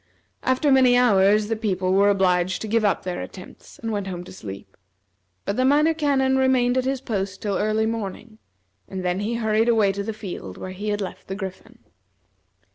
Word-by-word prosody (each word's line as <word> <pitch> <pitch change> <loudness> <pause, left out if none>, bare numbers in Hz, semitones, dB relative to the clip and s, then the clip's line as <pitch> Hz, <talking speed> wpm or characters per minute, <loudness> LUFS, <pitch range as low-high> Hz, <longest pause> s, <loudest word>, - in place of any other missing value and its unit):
After 260 +3 +2
many 255 -2 +5
hours 210 -3 +4
the 225 - -1
people 185 -4 -1
were 200 +1 +5
obliged 185 -2 +2
to - - -4
give 225 +1 +1
up 205 - +1
their 180 -1 -4
attempts, 185 - -11
and 225 -1 -4
went 205 -2 -2
home 180 -2 -5
to - - -12
sleep; 100 - -9 0.7
but 200 - -2
the 255 - +2
Minor 295 +4 +4
Canon 275 -4 +1
remained 255 -2 +3
at 255 -1 +1
his 265 0 -1
post 195 -6 -3
till 205 -2 -2
early 215 +1 +1
morning, 220 0 -5 0.5
and 185 -1 -5
then 180 +1 0
he 215 +3 -2
hurried 220 0 +1
away 215 -4 +4
to 200 +1 -4
the 215 +2 -3
field 185 - -7
where 185 - -6
he 205 +3 -5
had 205 0 -1
left 190 - -7
the 190 - -4
Griffin. 190 -2 -8
210 Hz, 200 wpm, -23 LUFS, 190-245 Hz, 0.7 s, many